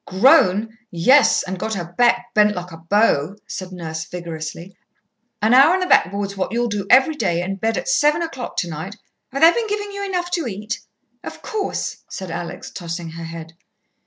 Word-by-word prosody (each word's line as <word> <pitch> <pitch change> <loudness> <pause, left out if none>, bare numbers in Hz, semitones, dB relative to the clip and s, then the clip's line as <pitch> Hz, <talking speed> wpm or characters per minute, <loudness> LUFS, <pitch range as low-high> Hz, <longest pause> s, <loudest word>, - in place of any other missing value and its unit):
"Grown! 215 +1 +3
Yes, 255 +12 +4
and 190 0 -5
got 220 +3 -2
her 175 -3 -4
back 240 +2 +2
bent 210 0 +4
like 180 0 -6
a 165 - -9
bow," 170 -1 +1
said 185 -1 -7
Nurse 160 -3 -5
vigorously. 170 +1 -7 0.7
"An 220 +3 +4
hour 275 +7 +7
on - - 0
the 370 - 0
backboard's 200 - +2
what 190 -1 -2
you'll 240 +1 0
do 205 -2 -3
every 265 +5 +6
day, 175 - -1
and 195 +1 -5
bed 225 -2 0
at 175 - -4
seven 300 +4 +3
o'clock 270 -7 -6
tonight. 175 +3 -4 0.4
Have 275 +4 -1
they 330 - +9
been 460 +4 -2
giving 410 -1 -3
you 400 0 -5
enough 360 -3 -2
to 340 -6 -1
eat?" 215 +3 -5 0.4
"Of - - -9
course," 425 -3 -3
said 190 -3 -6
Alex, 170 +1 -6
tossing 170 -2 -6
her 165 0 -7
head. 165 0 -9
200 Hz, 190 wpm, -20 LUFS, 175-265 Hz, 0.7 s, they